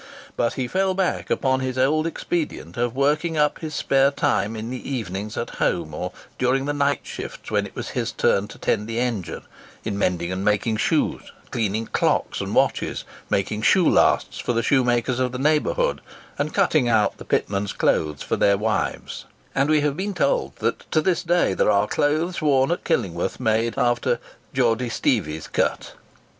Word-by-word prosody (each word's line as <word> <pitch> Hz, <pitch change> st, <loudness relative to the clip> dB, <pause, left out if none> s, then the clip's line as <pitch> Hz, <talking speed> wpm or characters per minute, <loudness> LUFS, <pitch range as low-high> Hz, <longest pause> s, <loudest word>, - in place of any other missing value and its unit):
But 115 Hz, -, +1 dB
he 130 Hz, -2 st, -2 dB
fell 190 Hz, +4 st, +1 dB
back 190 Hz, -2 st, -1 dB
upon 130 Hz, -1 st, +1 dB
his 130 Hz, -1 st, -3 dB
old 155 Hz, +5 st, +2 dB
expedient 160 Hz, -, -3 dB
of 120 Hz, 0 st, -1 dB
working 150 Hz, +4 st, +1 dB
up 150 Hz, 0 st, +2 dB
his 155 Hz, -2 st, -5 dB
spare 135 Hz, 0 st, +3 dB
time 115 Hz, -5 st, 0 dB
in 110 Hz, +2 st, -5 dB
the 130 Hz, +1 st, -6 dB
evenings 105 Hz, -4 st, -4 dB
at 120 Hz, -, -3 dB
home, 80 Hz, -3 st, 0 dB
or -, -, -4 dB, 0.3 s
during 130 Hz, +2 st, +2 dB
the 145 Hz, -, -1 dB
night 145 Hz, 0 st, +1 dB
shifts -, -, -8 dB
when -, -, +1 dB
it -, -, -17 dB
was -, -, -5 dB
his -, -, -2 dB
turn 100 Hz, +1 st, +1 dB
to -, -, -12 dB
tend 105 Hz, -1 st, 0 dB
the 115 Hz, 0 st, -4 dB
engine, 115 Hz, -8 st, -2 dB, 0.4 s
in 100 Hz, -2 st, -2 dB
mending 90 Hz, -2 st, 0 dB
and 95 Hz, +1 st, -3 dB
making 105 Hz, +2 st, +1 dB
shoes, -, -, 0 dB, 0.2 s
cleaning 110 Hz, -1 st, -1 dB
clocks -, -, 0 dB
and -, -, -3 dB
watches, -, -, +1 dB, 0.3 s
making 105 Hz, +2 st, 0 dB
shoe 175 Hz, +9 st, +4 dB
lasts -, -, +3 dB
for 120 Hz, -, -1 dB
the 115 Hz, 0 st, 0 dB
shoe 135 Hz, -2 st, +3 dB
makers 120 Hz, +1 st, +1 dB
of 130 Hz, -1 st, 0 dB
the -, -, -3 dB
neighbourhood, 155 Hz, -, +1 dB, 0.4 s
and -, -, 0 dB
cutting 135 Hz, -6 st, +2 dB
out 110 Hz, -2 st, +2 dB
the -, -, -8 dB
pitmen's 100 Hz, 0 st, -1 dB
clothes 75 Hz, -2 st, 0 dB
for -, -, -1 dB
their 100 Hz, 0 st, +4 dB
wives; 105 Hz, -1 st, -2 dB, 0.3 s
and 135 Hz, +2 st, +1 dB
we 155 Hz, -1 st, +4 dB
have 145 Hz, -1 st, 0 dB
been 195 Hz, +3 st, -3 dB
told 140 Hz, -5 st, +1 dB
that 115 Hz, +1 st, -1 dB
to 155 Hz, -, +3 dB
this 175 Hz, +2 st, +1 dB
day 175 Hz, +1 st, +2 dB
there -, -, +2 dB
are -, -, +4 dB
clothes 155 Hz, +5 st, 0 dB
worn 135 Hz, -1 st, +3 dB
at 175 Hz, -, -1 dB
Killingworth 85 Hz, -2 st, -1 dB
made 110 Hz, +1 st, +1 dB
after 120 Hz, -1 st, +1 dB, 0.3 s
"Geordy 125 Hz, -1 st, +1 dB
Steevie's 90 Hz, -, 0 dB
cut." -, -, -1 dB
125 Hz, 185 wpm, -23 LUFS, 110-150 Hz, 0.4 s, shoe